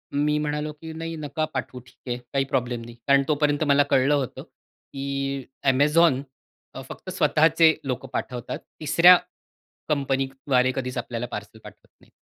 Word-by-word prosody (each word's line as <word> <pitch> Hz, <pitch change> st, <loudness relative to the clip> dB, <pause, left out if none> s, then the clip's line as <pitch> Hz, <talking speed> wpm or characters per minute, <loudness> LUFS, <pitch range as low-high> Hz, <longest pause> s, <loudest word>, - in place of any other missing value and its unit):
मी 150 Hz, +1 st, +2 dB
म्हणालो 150 Hz, 0 st, -2 dB
की 160 Hz, +2 st, -10 dB
"नाही, 165 Hz, +1 st, -5 dB
नका 155 Hz, 0 st, -3 dB
पाठवू 130 Hz, -1 st, -4 dB
ठीक -, -, -21 dB
आहे. 120 Hz, -, -1 dB, 0.2 s
काही 135 Hz, 0 st, +1 dB
प्रॉब्लेम 120 Hz, -1 st, -1 dB
नाही." 120 Hz, 0 st, -11 dB
कारण 140 Hz, 0 st, +5 dB
तोपर्यंत 150 Hz, 0 st, +1 dB
मला 145 Hz, 0 st, +5 dB
कळलं 135 Hz, +2 st, +4 dB
होतं 135 Hz, -4 st, -3 dB
की 140 Hz, 0 st, -6 dB, 0.3 s
Amazon 150 Hz, +1 st, +3 dB, 0.5 s
अ, -, -, -6 dB
फक्त -, -, -9 dB
स्वतःचे 160 Hz, +1 st, +4 dB
लोकं 130 Hz, 0 st, -3 dB
पाठवतात. 125 Hz, -2 st, -4 dB, 0.2 s
तिसऱ्या 170 Hz, +4 st, +7 dB, 0.7 s
कंपनीद्वारे 135 Hz, -2 st, 0 dB
कधीच 125 Hz, -1 st, -4 dB
आपल्याला 120 Hz, 0 st, -3 dB
पार्सल -, -, -7 dB
पाठवत -, -, -14 dB
नाहीत. -, -, -23 dB
140 Hz, 145 wpm, -24 LUFS, 130-150 Hz, 0.7 s, तिसऱ्या